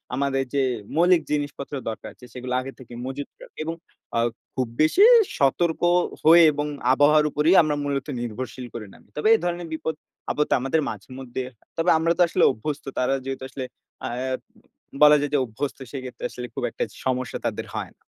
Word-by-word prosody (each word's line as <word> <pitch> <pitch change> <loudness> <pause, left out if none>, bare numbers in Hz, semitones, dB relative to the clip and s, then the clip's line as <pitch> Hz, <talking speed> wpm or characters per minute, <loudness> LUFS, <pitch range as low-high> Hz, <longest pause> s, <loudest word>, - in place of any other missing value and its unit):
আমাদের 135 0 0
যে 140 - +2 0.4
মৌলিক 175 +1 +5
জিনিসপত্র 145 -1 -3 0.2
দরকার 110 - -6
আছে, 125 - -15
সেগুলো 125 0 -5
আগে 135 +1 -7
থেকেই 120 -2 -11
মজুত 140 +2 -5
করা। - - -12 0.2
এবং 165 +1 -3 0.4
আ - - +3 0.4
খুব 130 -2 0
বেশি 155 - +5 0.3
সতর্ক 160 +4 +2 0.5
হয়ে 170 +2 +9
এবং 145 0 -2 0.3
আবহাওয়ার 150 +2 +5
উপরেই 155 +6 +3
আমরা 155 -2 0
মূলত 140 -1 -2
নির্ভরশীল 120 +2 -5
করে 115 -2 -6
নামি। - - -19
তবে 150 - +1
এই 225 - +4
ধরনের 175 -1 -2
বিপদ-আপদ 155 -1 -3
আমাদের 135 +5 +1
মাঝেমধ্যেই 130 -1 -6
হয়। 130 - -14 0.2
তবে 165 +2 +2
আমরা 165 +1 +1
তো - - +2
আসলে - - +1
অভ্যস্ত।" 140 +5 -5
তারা 125 +1 +2
যেহেতু 135 0 -4
আসলে 130 0 -5 0.4
আ - - -1 0.9
বলা 150 0 +8
যায় 145 - -1
যে, - - +4
অভ্যস্ত। 130 +5 -4
সেক্ষেত্রে 130 -3 -7
আসলে 125 0 -7
খুব - - -3
একটা - - -2 0.2
সমস্যা 130 -1 -1
তাদের - - -2
হয় - - -3
না। - - -56
140 Hz, 175 wpm, -24 LUFS, 130-155 Hz, 0.9 s, হয়ে